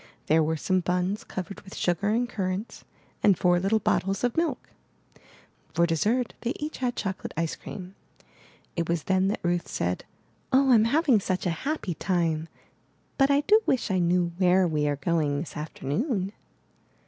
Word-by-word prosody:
There 160 +1 +4
were 160 +1 0
some 185 +4 +1
buns 180 +3 -1
covered 190 +1 -6
with 190 - -12
sugar 175 +3 0
and 235 +3 +1
currants, 195 -1 -4 0.4
and 195 -4 +5
four 175 -1 +3
little 195 +4 +2
bottles 195 -1 0
of 245 -1 +1
milk. 330 -1 -1 1.1
For 170 +1 +4
dessert 215 +9 +1
they 240 +2 -1
each 300 +1 -5
had 250 -1 -1
chocolate 190 -2 -4
ice 165 -1 -1
cream. 185 -1 -9 0.8
It 170 -1 -2
was 170 -3 0
then 190 0 +2
that 205 - -1
Ruth 175 0 0
said: 90 +1 -2 0.5
*'0h, 265 -1 +5
Fm 220 0 +5
having 280 -3 +4
such 185 -1 -2
a 175 - +2
happy 235 - -2
time, 165 -3 0 0.7
but 270 0 +5
I 280 0 +4
do 425 +8 +5
wish 255 -5 +1
I 185 - +2
knew 175 0 +2
where 185 0 +4
we 150 -2 0
are 145 - +1
going 150 -1 0
this 155 - -7
afternoon.'' 190 - -2
185 Hz, 170 wpm, -27 LUFS, 170-230 Hz, 1.1 s, and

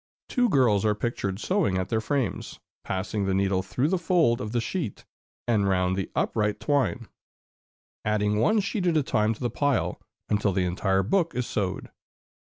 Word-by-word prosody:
Two 245 -2 +2
girls 120 - +3
are 105 -1 +2
pictured 100 -4 -3
sewing 175 - +1
at 95 - -2
their 110 -1 0
frames, 135 +2 -2 0.2
passing 100 +2 -2
the 95 -1 0
needle 95 -1 +1
through 125 +8 -1
the 185 0 +1
fold 165 -9 +2
of 105 - -4
the 120 - 0
sheet 120 - -4 0.4
and 105 -4 +2
round 90 -1 +1
the 95 -1 -3
upright 105 -1 0
twine, 140 -5 0 1.0
adding 105 -1 +1
one 215 - +3
sheet 195 -1 -2
at 165 -2 +3
a 150 - +2
time 110 -4 +1
to - - -18
the 120 -2 -1
pile, 145 0 0 0.3
until 100 -2 +1
the 90 0 +1
entire 95 +2 +1
book 170 - +1
is 125 -1 -1
sewed. 95 -4 -3
110 Hz, 180 wpm, -26 LUFS, 100-145 Hz, 1.0 s, girls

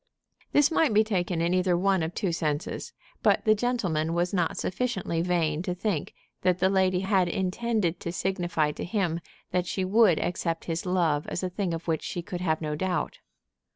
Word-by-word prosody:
This 290 +2 +4
might 315 -9 +3
be 215 - +6
taken 180 -5 -1
in 170 +1 +1
either 185 -1 +2
one 190 0 +2
of 160 +2 -3
two 195 -5 0
senses; 155 -3 -2 0.3
but - - +3
the 215 - +6
gentleman 190 -9 0
was 175 +2 0
not 175 -4 0
sufficiently 190 -6 -1
vain 165 -3 +1
to 180 0 -2
think 180 -4 -2 0.3
that 180 -1 +2
the 190 +1 +2
lady 185 -1 +2
had 190 -2 +2
intended 190 0 0
to 170 - -4
signify 175 -5 0
to - - -6
him 175 -4 -1 0.3
that 180 -1 0
she 190 0 -1
would 200 -3 +5
accept 165 -1 -2
his 165 +2 -3
love 165 -5 +1
as 175 - -3
a 185 - -2
thing 185 -1 -2
of 165 +1 -5
which 160 -2 0
she 175 - -4
could 175 +1 -5
have 160 -3 0
no 150 -1 -2
doubt. 180 +3 -2
180 Hz, 190 wpm, -27 LUFS, 165-195 Hz, 0.3 s, be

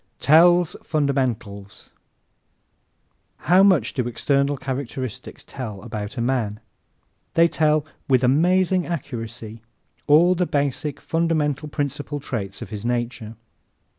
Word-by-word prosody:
Tells 175 +3 +5
Fundamentals 120 -9 -2 1.5
¶ - - -25
How 180 +2 +5
much 185 - +3
do 125 -3 -1
external 140 +4 0
characteristics 130 -2 -6
tell 110 -8 -7
about 110 +1 -6
a - - -1
man? 115 -4 -1 0.8
They 165 0 +6
tell, 155 -2 +1 0.2
with 130 -2 +3
amazing 180 +7 +2
accuracy, 115 -7 -6 0.5
all 165 +5 +6
the 180 -1 0
basic, 145 0 -2
fundamental 155 -3 -1
principal 145 0 -3
traits 100 -8 -5
of - - -12
his 105 -1 -6
nature. 120 -2 -3
140 Hz, 110 wpm, -22 LUFS, 115-155 Hz, 1.5 s, They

